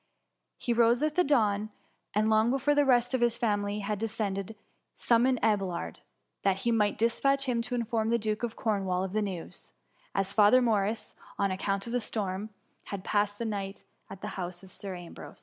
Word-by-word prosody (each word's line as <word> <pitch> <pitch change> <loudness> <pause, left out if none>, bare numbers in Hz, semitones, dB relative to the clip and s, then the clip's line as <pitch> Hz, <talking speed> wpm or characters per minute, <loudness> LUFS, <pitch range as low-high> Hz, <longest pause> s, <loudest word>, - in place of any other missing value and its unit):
He 240 - -1
rose 235 +3 +4
with 305 -1 +1
the 360 - +3
dawn; 215 -8 +2 0.5
and, 215 +1 +3
long 220 +1 +4
before 275 +3 +2
the 290 0 +4
rest 245 -1 +3
of 260 - +1
his 240 -1 +2
family 205 -3 0
had 205 0 -2
descended, 215 -2 -3 0.4
summoned 250 +2 +3
Abelard, 195 -6 0 0.4
that 195 -1 +1
he 235 - +2
might 210 -3 +2
dispatch 275 +4 +2
him 245 -3 0
to 245 +2 -3
inform 230 -2 0
the 235 - +3
Duke 215 -1 -2
of 235 -2 -3
Cornwall 195 -4 0
of 190 - -3
the 215 +2 0
news: 190 -5 -6 0.4
as 195 0 0
Father 210 +4 +6
Morris, 220 -3 0 0.2
on 200 -1 +1
account 195 +1 -1
of 235 - -5
the 245 - +2
storm, 205 -1 -3 0.4
had 195 -2 -6
passed 205 0 +1
the 235 - -3
night 200 -2 -4 0.3
at 190 - -9
the - - -4
house 175 0 -5
of 190 - -13
Sir 195 -2 -6
Ambrose. 175 -1 -10
215 Hz, 190 wpm, -29 LUFS, 195-235 Hz, 0.5 s, Father